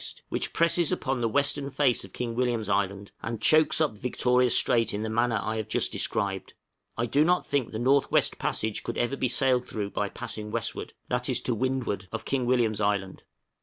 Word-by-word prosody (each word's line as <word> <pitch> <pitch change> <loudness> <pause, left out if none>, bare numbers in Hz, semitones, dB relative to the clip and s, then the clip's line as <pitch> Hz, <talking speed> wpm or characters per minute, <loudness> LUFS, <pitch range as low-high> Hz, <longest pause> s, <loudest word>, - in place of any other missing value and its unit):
which - - -3
presses 170 0 +2
upon 135 -8 -1
the 115 - +1
western 140 +2 +1
face 135 -3 +1
of 95 - -12
King 120 +2 -4
William's 120 -3 -1
Island, 100 0 -1
and 115 -2 -4
chokes 155 +7 +4
up 145 -10 0
Victoria 125 +1 +2
Strait 115 -1 +3
in 105 - -3
the 110 - -3
manner 115 0 +1
I 110 +2 -3
have 110 - -3
just - - +1
described. 95 -2 -2 0.4
I 115 - 0
do 140 +6 +3
not 180 +2 +2
think 140 -5 -1
the 110 - -5
North 135 +4 +2
West - - +2
Passage 110 -1 -1
could - - -5
ever 120 +3 0
be 130 - 0
sailed 130 -1 +1
through 100 -2 -4
by - - -2
passing 105 0 -6
westward - - -4 0.2
that - - 0
is, - - +2
to 125 - 0
windward 120 -5 -2
of 115 - -5
King 130 -3 -1
William's 115 -4 +1
Island. 100 -2 -1
120 Hz, 205 wpm, -27 LUFS, 110-135 Hz, 0.4 s, chokes